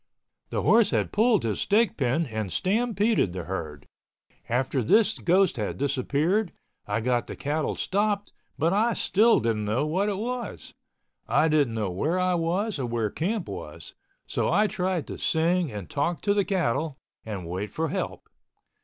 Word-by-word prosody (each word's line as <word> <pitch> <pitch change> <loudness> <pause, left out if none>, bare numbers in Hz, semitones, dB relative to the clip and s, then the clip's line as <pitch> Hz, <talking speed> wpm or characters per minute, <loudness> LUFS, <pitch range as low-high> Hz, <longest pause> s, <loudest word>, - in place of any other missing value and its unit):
The - - -2
horse 230 -2 +5
had - - 0
pulled 220 0 +3
his 110 -2 -1
stake 215 0 +2
pin 135 +4 +1
and 110 -6 -4
stampeded 215 - +1
the 90 -1 -4
herd. 80 -6 -6 0.6
After 130 +2 0
this 220 - +3
ghost 185 -2 +3
had 105 -3 -3
disappeared, 145 - 0 0.4
I 105 +2 -1
got 120 0 0
the - - -6
cattle 150 +2 -2
stopped 205 +1 -1 0.2
but 165 +4 +2
I 225 +4 +2
still 225 +4 +3
didn't 110 -2 -1
know 110 +8 0
what 185 +7 0
it 200 - -2
was. 245 +3 -5 0.5
I 160 - +3
didn't 145 -7 +2
know 105 -4 -1
where 150 - 0
I 185 0 +2
was 175 +3 -1
or 125 - -2
where 115 -3 -1
camp 195 +4 -2
was, 75 -6 -8 0.3
so - - -1
I 205 +5 +4
tried 185 -4 -1
to - - -7
sing 170 0 +1
and 105 -4 -6
talk 160 +4 -1
to 200 - +2
the 200 -1 +1
cattle 160 - -1 0.3
and 100 -6 -6
wait 95 +5 -4
for 160 0 -2
help. - - -4
160 Hz, 170 wpm, -26 LUFS, -, 0.6 s, horse